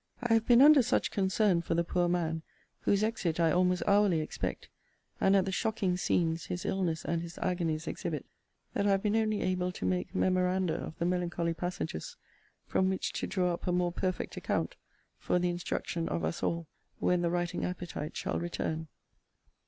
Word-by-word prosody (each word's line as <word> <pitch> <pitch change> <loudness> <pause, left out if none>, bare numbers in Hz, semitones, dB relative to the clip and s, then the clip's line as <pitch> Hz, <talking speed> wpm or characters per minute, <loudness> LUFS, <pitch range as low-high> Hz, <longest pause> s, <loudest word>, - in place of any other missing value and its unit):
I 240 -2 +1
have 225 0 +3
been 245 +2 +7
under 300 -1 +8
such 235 - +1
concern 190 -2 +2
for 165 - -1
the 170 - +2
poor 175 +1 +1
man, 165 -2 0 0.4
whose 200 +1 +2
exit 180 -7 -1
I 165 -1 +4
almost 180 +1 +2
hourly 200 -4 +4
expect, 155 - -4 0.5
and 195 +1 +4
at 195 - +4
the 190 - -2
shocking 200 -3 0
scenes 165 -2 0
his 180 - -4
illness 175 -4 -1
and 165 0 0
his 170 0 -8
agonies 165 -3 -1
exhibit, - - -3 0.5
that 200 - +1
I - - +4
have 195 -1 +2
been 210 0 +1
only 215 -2 +1
able 180 -1 0
to - - -5
make 90 -1 -1
memoranda 185 -1 +2
of 160 -1 -5
the 170 - -1
melancholy 175 -1 0
passages, 170 - -4 0.5
from 190 - +1
which 190 - -2
to - - -2
draw 180 -2 +1
up 170 - -6
a - - +2
more 175 0 +1
perfect 185 +1 -2
account, - - -1 0.4
for - - +1
the 180 0 +1
instruction 170 -1 -3
of 85 - -2
us 80 - -3
all, 170 0 -1 0.3
when 180 -1 +2
the 170 - +1
writing 175 0 -1
appetite 175 -4 -4
shall - - -2
return. 160 -2 -3
180 Hz, 185 wpm, -31 LUFS, 170-190 Hz, 0.5 s, under